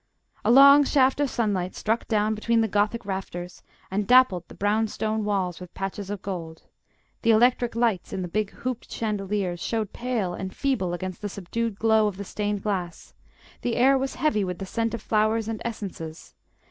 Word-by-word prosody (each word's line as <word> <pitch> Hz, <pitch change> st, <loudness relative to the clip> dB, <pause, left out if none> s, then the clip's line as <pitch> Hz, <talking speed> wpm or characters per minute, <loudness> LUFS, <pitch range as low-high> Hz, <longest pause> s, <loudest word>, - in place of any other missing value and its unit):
A 210 Hz, -, +1 dB
long 280 Hz, +3 st, +8 dB
shaft 270 Hz, -1 st, +3 dB
of 290 Hz, -2 st, +1 dB
sunlight 200 Hz, -7 st, -1 dB
struck 225 Hz, +2 st, -1 dB
down 215 Hz, -1 st, +1 dB
between 225 Hz, +2 st, +1 dB
the 225 Hz, -, +2 dB
Gothic 210 Hz, +2 st, 0 dB
rafters, 180 Hz, -2 st, -5 dB, 0.3 s
and 200 Hz, +1 st, -1 dB
dappled 245 Hz, -10 st, +5 dB
the -, -, -13 dB
brown 215 Hz, +2 st, +1 dB
stone 215 Hz, 0 st, -2 dB
walls 190 Hz, -4 st, -1 dB
with 180 Hz, -1 st, -11 dB
patches 195 Hz, 0 st, -4 dB
of 205 Hz, -2 st, -5 dB
gold; 165 Hz, -4 st, -6 dB, 0.6 s
the 230 Hz, -, +1 dB
electric 240 Hz, +1 st, +3 dB
lights 230 Hz, -6 st, 0 dB
in 185 Hz, -, -3 dB
the -, -, -3 dB
big 210 Hz, +3 st, -1 dB
hooped 250 Hz, +1 st, -5 dB
chandeliers 200 Hz, -4 st, -2 dB
showed 220 Hz, +1 st, -2 dB
pale 235 Hz, -7 st, -2 dB
and 190 Hz, +1 st, -6 dB
feeble 220 Hz, -11 st, 0 dB
against 185 Hz, +1 st, -6 dB
the 205 Hz, -, -3 dB
subdued 205 Hz, +3 st, -3 dB
glow 220 Hz, -1 st, +3 dB
of 200 Hz, -3 st, -4 dB
the 200 Hz, -, -6 dB
stained 205 Hz, 0 st, -3 dB
glass; 185 Hz, -5 st, -4 dB, 0.5 s
the 240 Hz, -, -1 dB
air 265 Hz, +3 st, +5 dB
was 270 Hz, 0 st, -1 dB
heavy 295 Hz, -10 st, +1 dB
with 180 Hz, -2 st, -3 dB
the 195 Hz, -, -5 dB
scent 230 Hz, +4 st, -1 dB
of 225 Hz, -, -9 dB
flowers 215 Hz, +1 st, +1 dB
and 225 Hz, -1 st, -4 dB
essences. 190 Hz, -8 st, -6 dB
210 Hz, 185 wpm, -25 LUFS, 190-230 Hz, 0.6 s, long